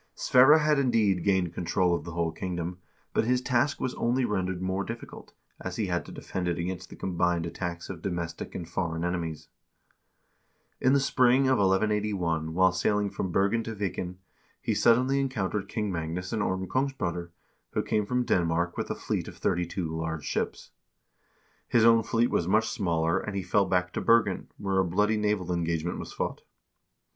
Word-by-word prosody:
Sverre 135 +5 +6
had 150 -2 +3
indeed 110 -9 +2
gained 95 -4 +1
control 90 +1 +1
of 85 - -2
the 85 - -6
whole 85 -1 0
kingdom, 90 0 -4 0.3
but - - +2
his 125 +2 +2
task 130 +3 +1
was 130 - -2
only 125 +2 +1
rendered 95 -4 -1
more 95 +1 -1
difficult, 115 +2 -8 0.3
as 95 -1 -5
he 110 - -1
had 90 -2 -1
to - - -9
defend 90 -2 -4
it 85 -1 0
against 90 +1 -4
the - - -10
combined 90 -2 0
attacks 85 0 -5
of 90 -4 -7
domestic 85 -3 -4
and 85 - -5
foreign 85 -2 -2
enemies. 80 -3 -3 1.3
In 130 - +3
the 140 - +5
spring 130 -1 +4
of 130 -2 +3
1181, 95 -5 +1
while 95 0 +5
sailing 100 +2 0
from 95 - -3
Bergen 100 +5 +2
to 115 0 -5
Viken, 90 -3 -3 0.4
he - - -1
suddenly 130 +4 +3
encountered 105 -7 -2
King 105 -3 -2
Magnus 85 +3 -3
and 110 - 0
Orm 95 -1 -1
Kongsbroder, 90 -9 -2 0.4
who - - 0
came 105 -1 0
from 125 +1 0
Denmark, 85 -2 +1
with - - -3
a - - -1
fleet - - -3
of - - -10
thirty 85 0 0
two 85 -2 -3
large 80 -2 -3
ships.1 - - -3 1.0
His 115 -2 +4
own 115 -1 +6
fleet 115 +2 +1
was 85 - +1
much 110 +4 +3
smaller, 85 -5 0
and 105 - -5
he 95 - -2
fell 100 +3 +2
back 90 -1 0
to - - -2
Bergen, 115 -5 +3
where 95 -2 0
a - - +4
bloody 105 +5 +1
naval 105 -4 0
engagement 85 0 -1
was - - -7
fought. - - -3
95 Hz, 180 wpm, -28 LUFS, 85-110 Hz, 1.3 s, Sverre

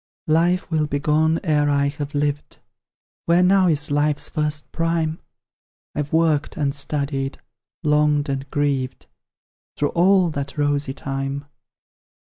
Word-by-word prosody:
Life 175 +3 +2
will 155 -2 +1
be 145 - -1
gone 155 +2 +2
ere 150 -3 +2
I 140 0 +2
have 145 0 -6
lived; 145 0 -2 0.7
Where 170 +2 +4
now 190 0 +4
is 145 -3 +1
Life's 145 0 +1
first 150 -1 -3
prime? 165 -1 -1 0.7
I've 150 -1 -3
worked 160 -2 +1
and 140 -3 0
studied, 140 -1 -2 0.5
longed 150 -1 +2
and 135 0 -3
grieved, 135 -3 -1 0.7
Through 145 - +1
all 180 0 +3
that 140 -1 -5
rosy 145 -2 0
time. 135 0 -4
150 Hz, 130 wpm, -22 LUFS, 140-160 Hz, 0.7 s, Where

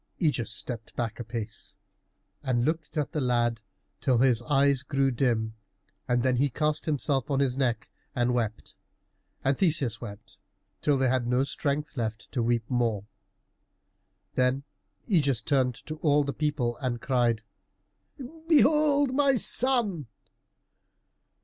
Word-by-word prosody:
Ægeus 145 - +1
stepped 110 0 -5
back 120 -1 -3
a - - -3
pace 115 -2 -6 0.7
and 120 -2 0
looked 160 0 -2
at 150 -2 -1
the 150 - -2
lad 120 -3 +1 0.4
till 130 -2 +2
his 125 -2 +3
eyes 140 -2 +4
grew 135 -1 0
dim, 115 -3 0 0.5
and 120 -1 +1
then 130 -1 +2
he 140 +3 +2
cast 150 +4 0
himself 140 -3 0
on 140 -2 +1
his 135 -3 +1
neck 120 -5 -1 0.3
and 120 0 +1
wept, 115 -3 -3 0.7
and 135 +1 +2
Theseus 140 - +1
wept, 110 -1 -10 0.4
till 145 -2 +2
they 130 0 +2
had 125 -1 +1
no 125 +2 +2
strength 145 +1 -3
left 110 -1 -4
to 125 - -1
weep 115 -1 0
more. 115 -5 0 1.3
Then 130 +2 +1 0.4
Ægeus 140 - +1
turned 130 -4 +2
to 155 - -6
all 150 -2 +3
the 140 0 -3
people 145 -6 -1
and 125 -3 -2
cried, 120 -4 +1 1.0
"Behold 295 -3 +4
my 280 -1 +3
son!" 230 - +1
130 Hz, 135 wpm, -27 LUFS, 120-150 Hz, 1.3 s, eyes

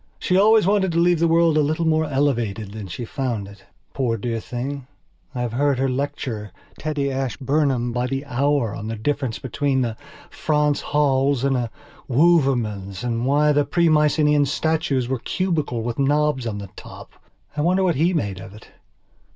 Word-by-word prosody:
She 180 - 0
always 215 +1 +5
wanted 195 -2 +2
to - - -1
leave 175 0 +3
the 170 - +3
world 165 -1 +3
a - - +4
little 155 +3 0
more 160 0 +2
elevated 120 -8 -1
than 105 -2 -7
she 105 +7 -6
found 115 -5 -3
it. 100 0 -15 0.3
Poor 120 -4 0
dear 115 +1 -3
thing, 130 +4 -5 0.5
I 125 - -2
have 120 -2 -2
heard 140 +1 +1
her 135 +1 +1
lecture 125 -5 -3 0.3
Teddy 145 -2 -2
Ashburnham 135 -1 0
by 125 +1 -1
the 135 +2 -3
hour 140 -3 0
on 105 +1 -6
the 115 - -3
difference 130 +1 -2
between 130 0 -1
a 115 -2 -4 0.4
Franz 150 -1 0
Hals 140 -2 +1
and 135 -1 +2
a 120 -2 -1 0.4
Wouvermans 120 - +2
and 120 0 -1
why 150 +2 +3
the 145 0 +3
Pre 170 +4 +2
Mycenaean 150 -1 +3
statues 150 -4 0
were 130 -1 -2
cubical 155 -9 -2
with 120 +1 -4
knobs 145 -2 +1
on 105 -2 -3
the 100 -2 -8
top. - - -11 0.4
I 150 - -1
wonder 185 +4 +2
what 180 -2 +2
he 160 +5 +2
made 100 - -2
of 95 +1 -11
it? 105 - -15
135 Hz, 180 wpm, -22 LUFS, 120-150 Hz, 0.5 s, always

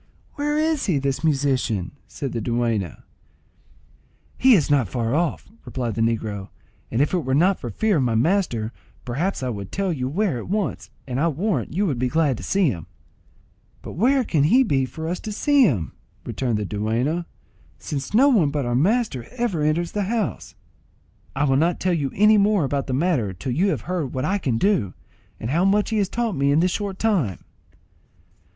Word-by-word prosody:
"Where 295 0 -1
is 310 -4 +1
he, 175 -7 +2
this 135 +1 -2
musician?" 135 - 0 0.2
said 135 -3 -5
the 115 - -3
dueña. 115 -6 -1 1.3
"He 260 -2 +6
is 155 -6 +1
not 135 -6 +3
far 115 +3 -2
off," 165 +1 -1 0.2
replied 120 -4 -3
the 115 - -2
negro; 110 -4 -1 0.4
"and 115 - 0
if 150 - -2
it 180 - +2
were 130 -4 -1
not 180 +6 +3
for 120 - -5
fear 205 - +1
of - - +2
my 120 -2 0
master, 120 - +1 0.3
perhaps 145 +7 -2
I 130 - -1
would 100 -5 -6
tell 195 -2 -1
you 130 -4 -3
where 180 - 0
at - - -8
once, 205 0 -2 0.2
and 130 -1 -3
I 165 - +2
warrant 180 +7 -1
you 200 +3 +2
would 140 -10 -1
be 130 - +1
glad 145 -2 +1
to - - -8
see 195 -3 +2
him." 85 -9 -5 1.0
"But - - -7
where 255 - +2
can 155 -10 +1
he 250 - +5
be 135 - +1
for 160 +4 -6
us 175 +2 -2
to 215 - -6
see 280 +5 +4
him," 100 - -1 0.3
returned 120 -5 -1
the 105 - -2
dueña, 115 - -1 0.5
"since 140 -2 -5
no 250 +7 +5
one 205 - +4
but 145 -2 -2
our 120 - -1
master 165 - +1
ever 235 -10 -1
enters 155 +3 0
this 205 -2 -2
house?" 220 -2 -3 0.8
"I 140 - +1
will 135 -2 +3
not 170 +4 +1
tell 185 -1 +1
you 145 -5 -1
any 210 +1 +5
more 200 -3 +3
about 140 0 -1
the 130 - -2
matter 130 - +1
till 125 +9 -5
you 175 +11 +2
have 195 - 0
heard 175 -8 -3
what 130 +1 -1
I 200 +5 0
can 125 -10 0
do, 120 - +1 0.4
and 115 - -4
how 170 +5 +2
much 205 +3 +2
he 220 - +1
has 195 -2 +1
taught 230 -4 -1
me 140 0 +2
in 145 - +4
this 180 +2 +2
short 200 -1 -3
time." 175 - 0
150 Hz, 200 wpm, -23 LUFS, 125-195 Hz, 1.3 s, He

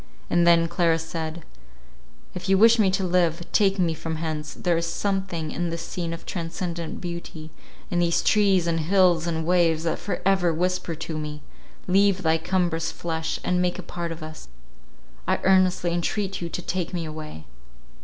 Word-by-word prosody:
And 175 0 +4
then 165 -1 +5
Clara 170 -1 +2
said, 165 0 -5 0.9
"If 180 +1 -5
you 195 - +5
wish 225 +3 +6
me 200 -3 +5
to 190 +1 0
live, 175 -2 +1
take 200 -2 +3
me 175 -3 +2
from 160 0 -4
hence. 155 -1 -4
There 175 -2 0
is 165 0 -1
something 185 -3 -2
in 175 0 -2
this 165 0 -4
scene 170 -2 -3
of 165 - -7
transcendent 170 -1 -4
beauty, 170 -3 -7 0.4
in 175 - +1
these 170 -1 +2
trees, 200 -4 +3
and 165 -1 0
hills 175 0 +3
and 160 -1 -1
waves, 165 -2 +3
that 165 -1 -1
for 205 - -3
ever 190 -3 +3
whisper 180 +1 -1
to 160 0 -5
me, 150 -1 -6 0.4
leave 195 +1 +3
thy 160 0 +3
cumbrous 170 -1 0
flesh, 160 -1 -3
and 180 0 +1
make 180 0 0
a 185 - -6
part 170 0 -5
of 165 -1 -7
us. 155 - -9 0.8
I - - +2
earnestly 185 -2 +3
entreat 190 +3 -2
you 170 - -3
to 180 - -4
take 180 0 -3
me 170 -2 -2
away." 155 - -8
170 Hz, 180 wpm, -25 LUFS, 165-185 Hz, 0.9 s, wish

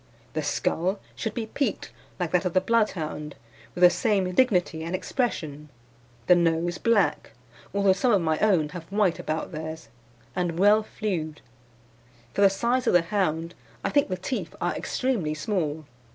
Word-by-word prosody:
"The - - -1
skull 185 +4 0 0.2
should 220 - -4
be 230 - -2
peaked 235 +1 -2 0.3
like 175 -3 -1
that 180 - +2
of 180 - -1
the 185 - +5
Bloodhound, 180 -8 -1 0.4
with 180 - 0
the 175 - +9
same 195 -5 +1
dignity 180 -8 +2
and 170 +3 -2
expression, 155 - -3 0.6
the - - +7
nose 170 0 +1
black 195 - +1 0.4
(although 200 -1 +3
some 215 +7 +1
of 205 - +4
my 160 -1 +1
own 180 -8 +3
have 170 +1 -9
white 200 -4 +2
about 155 +3 -3
theirs), 160 -5 -6 0.5
and 175 -2 -1
well 205 +3 +5
flewed. 180 -8 -4 0.9
For - - 0
the 200 - +7
size 240 +5 0
of - - +3
the 175 -1 +5
hound 170 -3 -1 0.3
I - - -1
think 285 -5 +3
the 185 - -2
teeth 250 +8 -4
are - - 0
extremely 215 -13 -1
small. 155 -3 -2
180 Hz, 165 wpm, -26 LUFS, 160-210 Hz, 0.9 s, the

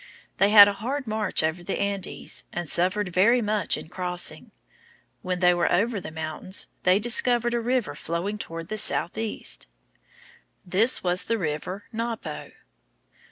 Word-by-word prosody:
They 200 - +5
had 205 -1 +10
a 205 - 0
hard 260 +8 -4
march 215 -6 0
over 160 +2 -1
the 190 - -3
Andes, 200 -2 -3
and 175 -1 -4
suffered 185 +5 +2
very 230 +7 +4
much 215 -2 +1
in - - -8
crossing. 180 0 -5 0.7
When 180 0 -3
they 180 -1 +5
were 175 0 +1
over 205 +3 +1
the - - -7
mountains, 160 +4 -3
they 180 +1 +4
discovered 240 +2 +2
a 240 - +1
river 245 0 0
flowing 180 +6 -4
toward 165 -1 -6
the 215 - -1
southeast. 220 +3 -1 1.0
This 200 +8 +2
was 180 0 0
the 230 - 0
river 180 +3 -4
Napo. 230 0 -4
200 Hz, 150 wpm, -25 LUFS, 180-220 Hz, 1.0 s, had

